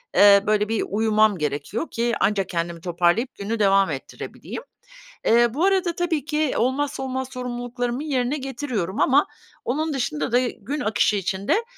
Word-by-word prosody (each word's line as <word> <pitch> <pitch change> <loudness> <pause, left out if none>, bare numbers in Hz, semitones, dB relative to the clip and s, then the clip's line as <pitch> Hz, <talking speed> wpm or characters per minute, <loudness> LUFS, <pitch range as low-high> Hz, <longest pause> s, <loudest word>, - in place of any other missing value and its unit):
eee, 200 -1 +7
böyle, 210 0 +2
bir 225 -1 0
uyumam 215 -1 +3
gerekiyor 150 - -3
ki 235 +1 0
ancak 195 -2 +1
kendimi 170 -1 -3
toparlayıp 175 +8 +1
günü 215 +3 -3
devam 195 -3 +4
ettirebileyim. 140 - -7 0.6
Eee, 235 +1 +5
bu 325 +6 +1
arada 380 -3 +2
tabii 330 -5 -1
ki 305 -2 0
olmazsa 270 +3 0
olmaz 260 0 -3
sorumluluklarımı 245 +1 -3
yerine 270 -1 0
getiriyorum 250 - -3
ama 280 +2 +4 0.4
onun 310 +5 -1
dışında 190 - -2
da 245 - +5
gün 270 +7 -5
akışı 215 -3 +2
içinde 195 - 0
235 Hz, 150 wpm, -23 LUFS, 200-270 Hz, 0.6 s, eee